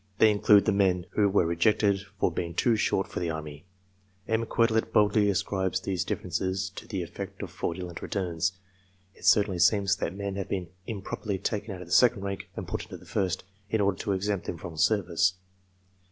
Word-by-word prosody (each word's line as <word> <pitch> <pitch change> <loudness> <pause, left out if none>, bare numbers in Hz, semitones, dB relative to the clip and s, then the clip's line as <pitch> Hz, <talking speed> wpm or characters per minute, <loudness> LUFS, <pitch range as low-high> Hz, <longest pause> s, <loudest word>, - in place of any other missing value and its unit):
They 110 0 +6
include 105 0 +5
the - - +3
men 95 -3 +2
who 105 -1 +3
were 95 -3 +3
rejected 95 +4 +2 0.2
from 90 - +2
being 85 0 -3
too 120 -2 +3
short 95 -2 +1
for - - -5
the 85 -1 -1
army. 75 0 -6 0.6
M. 115 0 0
Quetelet 115 -1 +2
boldly 105 0 +4
ascribes 95 -1 0
these 95 -3 -2
differ - - -4
ences 95 +2 -2
to - - -9
the 95 -5 -3
effect 85 - -7
of - - -6
fraudulent 85 0 -4
returns. 90 -3 -1 0.6
It - - -12
certainly 100 -4 +4
seems 100 0 +4
that 85 - -3
men 100 -1 -4
have 100 - -4
been 90 -3 -3 0.2
improperly 100 -2 -4
taken 105 +1 -3
out 90 - -8
of - - -14
the - - -3
second 120 -5 +5
rank 100 0 -5
and - - -5
put - - -3
into - - -9
the - - -17
first, 95 -4 -1 0.3
in 110 - +1
order 100 -2 +1
to 100 - -1
exempt 100 0 -2
them 85 - -3
from 80 +1 -8
service. 90 -1 +2
95 Hz, 195 wpm, -28 LUFS, 90-105 Hz, 0.6 s, They